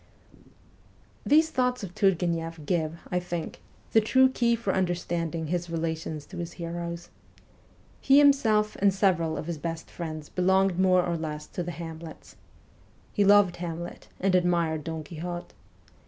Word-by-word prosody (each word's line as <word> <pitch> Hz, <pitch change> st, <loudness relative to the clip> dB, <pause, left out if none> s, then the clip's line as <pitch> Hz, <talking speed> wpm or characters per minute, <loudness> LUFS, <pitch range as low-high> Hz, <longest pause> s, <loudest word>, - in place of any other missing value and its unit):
These 315 Hz, +2 st, +5 dB
thoughts 250 Hz, -3 st, 0 dB
of 180 Hz, -3 st, -6 dB
Turgueneff 170 Hz, -5 st, 0 dB
give, 165 Hz, -2 st, -1 dB
I 180 Hz, -, +1 dB
think, 175 Hz, -2 st, -5 dB, 0.3 s
the 220 Hz, -, +5 dB
true 260 Hz, +4 st, +4 dB
key 235 Hz, -2 st, +2 dB
for 220 Hz, -4 st, -2 dB
understanding 170 Hz, -3 st, -1 dB
his 175 Hz, +2 st, -2 dB
relations 160 Hz, -2 st, -3 dB
to 185 Hz, -, -11 dB
his 175 Hz, 0 st, -5 dB
heroes. 170 Hz, 0 st, -5 dB, 0.9 s
He 275 Hz, -, +5 dB
himself 225 Hz, -8 st, +4 dB
and 200 Hz, 0 st, +4 dB
several 180 Hz, -5 st, +1 dB
of -, -, -4 dB
his 170 Hz, -2 st, -4 dB
best 165 Hz, +1 st, -5 dB
friends 155 Hz, -3 st, -6 dB
belonged 190 Hz, 0 st, +2 dB
more 185 Hz, -1 st, +4 dB
or 170 Hz, -1 st, -1 dB
less 150 Hz, -1 st, -5 dB
to -, -, -4 dB
the 175 Hz, -, -4 dB
Hamlets. 165 Hz, -1 st, -9 dB, 0.8 s
He 205 Hz, -, +2 dB
loved 200 Hz, -2 st, +5 dB
Hamlet, 170 Hz, 0 st, -6 dB
and 190 Hz, 0 st, +1 dB
admired 170 Hz, -4 st, +1 dB
Don 160 Hz, -1 st, -4 dB
Quixote. 175 Hz, +3 st, -6 dB
175 Hz, 145 wpm, -27 LUFS, 165-195 Hz, 0.9 s, These